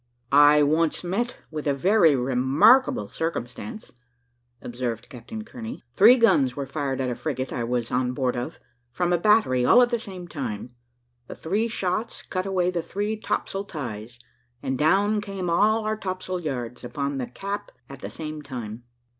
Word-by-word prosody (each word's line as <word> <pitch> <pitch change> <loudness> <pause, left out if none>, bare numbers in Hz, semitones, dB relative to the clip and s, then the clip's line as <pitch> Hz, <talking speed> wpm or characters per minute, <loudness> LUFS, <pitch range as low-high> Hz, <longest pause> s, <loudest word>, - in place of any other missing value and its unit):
"I 145 +1 +7
once 155 +3 +1
met 225 +8 -2
with 155 -1 -4
a 140 - +2
very 170 0 +4
remarkable 130 - +4
circumstance," 165 - -5 0.7
observed 120 -2 -4
Captain 135 - -8
Kearney. 235 0 -8
"Three 230 +6 +7
guns 140 - +3
were 140 - -3
fired 135 -1 -3
at 130 -1 -1
a - - -3
frigate 130 -3 -3
I 120 - -2
was 120 -1 -2
on 125 0 0
board 130 -1 0
of, 120 0 -5 0.3
from 175 +8 0
a 175 - +2
battery, 210 - +3
all 235 - +6
at 240 - 0
the 235 - +1
same 190 -6 -8
time. 125 -8 -5 0.6
The - - -8
three 205 +8 -1
shots 215 0 -2
cut 185 0 -3
away 180 -2 +1
the 175 -2 -1
three 205 +6 -3
topsail 200 -2 -3
ties, 120 - -6 0.5
and 130 - -1
down 200 +9 +2
came 195 -4 -4
all 215 +5 +3
our 215 0 0
topsail 185 -2 -4
yards 125 -7 -5
upon 140 +3 -3
the 125 - -3
cap 200 +9 -5 0.2
at 135 -1 -10
the - - -6
same 155 -1 -6
time. 120 -4 -7
155 Hz, 170 wpm, -25 LUFS, 125-200 Hz, 0.7 s, I